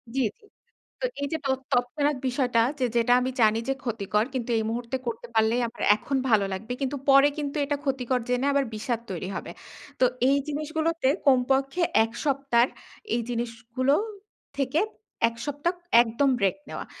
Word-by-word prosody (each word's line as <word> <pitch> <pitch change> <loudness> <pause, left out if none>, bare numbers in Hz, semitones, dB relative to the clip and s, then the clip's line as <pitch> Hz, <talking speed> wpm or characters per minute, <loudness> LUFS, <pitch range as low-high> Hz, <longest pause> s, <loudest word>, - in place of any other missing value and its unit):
জি, - - +1 0.2
জি। - - -30 0.6
তো - - -1 0.2
এই 285 - 0
যে - - +1
তৎ 265 -1 +1
তৎক্ষনাৎ 285 +4 +1
বিষয়টা 245 -2 +2 0.2
যে 255 - +2
যেটা 235 +1 +4
আমি 255 +1 -1
জানি 220 0 +4
যে - - +3
ক্ষতিকর 215 -3 0
কিন্তু 250 -2 -3
এই 220 - 0
মুহূর্তে 235 +2 -3
করতে 235 +1 -4
পারলেই 225 +2 +3
আমার 230 - -11
এখন 270 +5 -2
ভালো 215 -3 +4
লাগবে। 220 +6 -5
কিন্তু 275 +1 -1
পরে 275 +1 +7
কিন্তু 290 -1 -3
এটা 290 0 -1
ক্ষতিকর 260 -2 0
জেনে 250 +2 +1
আবার 280 -1 +2
বিষাদ 230 +2 -2
তৈরি 180 0 -4
হবে। - - -5 0.5
তো 255 - +5 0.2
এই 280 - +4
জিনিসগুলোতে 315 +1 -1 0.2
কমপক্ষে 270 +4 +3 0.2
১ 225 - -4
সপ্তাহর 270 -4 +2 0.5
এই 240 - 0
জিনিসগুলো 235 +2 -1 0.6
থেকে 275 +2 +1 0.5
১ 230 - -5
সপ্তাহ 290 +4 -1 0.3
একদম 240 +4 +1
ব্রেক 195 -3 +2
নেওয়া। - - -5
255 Hz, 165 wpm, -26 LUFS, 230-280 Hz, 0.6 s, পরে